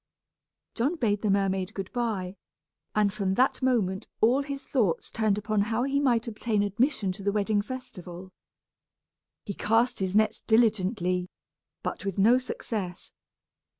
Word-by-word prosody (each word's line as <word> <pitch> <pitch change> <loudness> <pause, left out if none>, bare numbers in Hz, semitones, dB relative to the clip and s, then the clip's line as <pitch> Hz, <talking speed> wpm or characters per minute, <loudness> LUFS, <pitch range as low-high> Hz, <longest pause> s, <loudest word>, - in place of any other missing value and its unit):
John 270 +9 0
bade 210 -9 0
the 215 - 0
mermaid 195 -1 0
good 195 -2 -5
by, 210 -7 -2 0.6
and 210 -2 +3
from 195 -2 -1
that 260 +5 +2
moment 215 -8 +1
all 245 +5 +4
his 275 -1 -5
thoughts 210 - 0
turned 215 -2 +1
upon 210 0 0
how 225 +3 0
he 275 +1 +1
might 240 -4 +2
obtain 215 -2 0
admission 210 0 +1
to 185 - -8
the 200 +1 +1
wedding 205 0 +1
festival. 190 -7 -8 1.1
He 200 - -4
cast 225 +5 +1
his 190 0 -1
nets 215 0 +2
diligently, 195 -5 +2 0.5
but - - -4
with 195 -2 -3
no 230 +6 +5
success. 210 -7 -5
210 Hz, 145 wpm, -27 LUFS, 195-240 Hz, 1.1 s, no